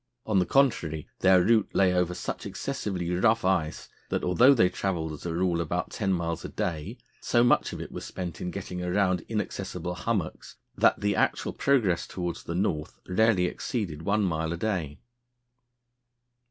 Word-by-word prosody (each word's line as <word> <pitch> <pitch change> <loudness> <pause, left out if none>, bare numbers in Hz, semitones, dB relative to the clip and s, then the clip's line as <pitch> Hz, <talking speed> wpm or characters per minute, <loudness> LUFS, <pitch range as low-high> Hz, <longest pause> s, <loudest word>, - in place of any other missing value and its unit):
On 105 -3 +2
the 90 - +1
contrary, 85 - +1
their 95 -1 +5
route 110 +1 +3
lay 95 -2 +4
over 90 0 +1
such - - -5
excessively 90 -4 -3
rough 110 +4 +2
ice 85 -5 0 0.2
that - - -1
although 125 +10 +5
they 90 -7 +5
travelled 85 -4 -2
as 75 - -7
a 85 - -2
rule 85 -1 +1
about 85 +2 -2
ten 100 -3 -1
miles 85 -2 -1
a - - -5
day, 90 - -3 0.2
so 120 -1 +2
much 120 - +3
of - - -6
it - - -7
was - - -6
spent 90 -2 -6
in 90 - -2
getting 90 0 -5
round 90 0 +1
inaccessible 90 - -3
hummocks, 90 -1 -3 0.2
that - - +3
the 100 -1 +1
actual - - 0
progress 115 -11 +1
towards 90 -2 -4
the 85 - -4
North 80 -5 -2
rarely 95 0 +3
exceeded 90 - -3
one 105 +5 +1
mile 80 -3 -1
a 85 - -3
day. 85 -7 -2
90 Hz, 170 wpm, -27 LUFS, 85-105 Hz, 0.2 s, their